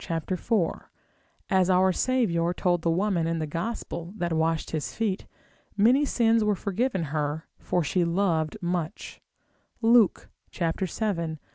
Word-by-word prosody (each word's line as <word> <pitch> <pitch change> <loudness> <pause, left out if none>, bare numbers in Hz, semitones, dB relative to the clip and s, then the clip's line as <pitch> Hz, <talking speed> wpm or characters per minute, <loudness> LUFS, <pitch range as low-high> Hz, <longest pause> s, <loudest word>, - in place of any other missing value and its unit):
4, 190 -2 -1 0.6
as 190 -1 +3
our 185 +1 +4
Saviour 180 -9 +1
told 175 -2 +1
the 165 - 0
woman 175 -1 +1
in 165 0 -1
the 160 - -2
Gospel, 170 +2 -5
that 175 -3 -1
washed 160 0 0
his 155 -2 -3
feet, 210 -4 -2 0.5
many 250 +8 +5
sins 230 -4 +2
were 210 -1 +2
forgiven 200 +1 -1
her, 150 +1 -2
for 175 - 0
she 175 +4 +1
loved 170 -1 0
much, 175 0 -3 0.6
Luke 225 -4 +4 0.2
vii. 170 -1 -2
180 Hz, 130 wpm, -26 LUFS, 165-210 Hz, 0.6 s, many